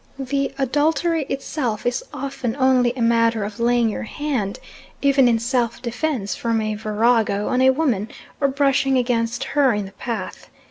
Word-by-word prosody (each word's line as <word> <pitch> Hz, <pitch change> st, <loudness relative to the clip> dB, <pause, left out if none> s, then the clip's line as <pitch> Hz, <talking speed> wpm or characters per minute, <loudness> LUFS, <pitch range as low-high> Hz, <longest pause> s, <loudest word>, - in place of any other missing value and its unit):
The 275 Hz, 0 st, -1 dB
adultery 300 Hz, +3 st, +1 dB
itself 265 Hz, -5 st, -3 dB
is 245 Hz, 0 st, 0 dB
often 270 Hz, -4 st, -4 dB
only 260 Hz, -2 st, +3 dB
a 245 Hz, -, -1 dB
matter 230 Hz, -1 st, +2 dB
of 205 Hz, +3 st, -6 dB
laying 240 Hz, 0 st, +3 dB
your 215 Hz, -, -3 dB
hand, 240 Hz, -5 st, -3 dB, 0.5 s
even 275 Hz, -2 st, +5 dB
in 235 Hz, -1 st, +3 dB
self 235 Hz, 0 st, -1 dB
defence 240 Hz, -3 st, -2 dB
from 230 Hz, -1 st, -1 dB
a 215 Hz, 0 st, -1 dB
virago, 215 Hz, -1 st, +1 dB
on 255 Hz, -, +1 dB
a 260 Hz, -, +6 dB
woman 260 Hz, -7 st, 0 dB, 0.3 s
or 280 Hz, -, +3 dB
brushing 275 Hz, -1 st, +2 dB
against 235 Hz, -2 st, 0 dB
her 275 Hz, -4 st, +2 dB
in 205 Hz, -1 st, -2 dB
the 195 Hz, -, -10 dB
path. 215 Hz, -1 st, -6 dB
245 Hz, 160 wpm, -21 LUFS, 225-275 Hz, 0.5 s, a